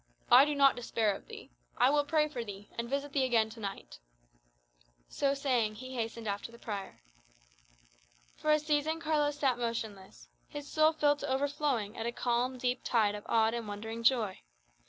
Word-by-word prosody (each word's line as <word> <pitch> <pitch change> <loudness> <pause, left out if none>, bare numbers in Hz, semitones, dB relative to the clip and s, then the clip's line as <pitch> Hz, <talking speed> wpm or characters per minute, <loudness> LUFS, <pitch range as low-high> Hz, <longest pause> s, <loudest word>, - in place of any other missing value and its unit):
"I 255 +3 +9
do 295 0 -1
not 275 -1 +5
despair 225 -3 0
of - - -12
thee. - - -11 0.3
I 260 - +5
will 295 0 +3
pray 300 +1 +2
for 255 -6 -5
thee, 205 -1 -9
and 235 0 -4
visit 280 +1 -2
thee 275 - +2
again 230 -4 +2
to 225 - -11
night." 195 - -7 1.1
So 275 0 0
saying, 250 -6 0
he 255 +3 -8
hastened 230 -2 -4
after 205 +3 -3
the 235 - -13
prior. 200 - -7 1.3
For 305 - -3
a 305 - +6
season 300 +1 0
Carlos 300 -3 0
sat 260 -4 +1
motionless, 210 - -5 0.2
his 290 -1 -7
soul 310 +1 +3
filled 290 -1 +2
to 285 - -4
overflowing 270 -6 0
with 225 0 -4
a - - -1
calm, 245 +2 -1
deep 250 0 -1
tide 215 -4 +2
of 205 0 -8
awed 225 0 +3
and 235 -2 -4
wondering 220 +3 -5
joy. 230 -5 +2
245 Hz, 180 wpm, -31 LUFS, 220-285 Hz, 1.3 s, I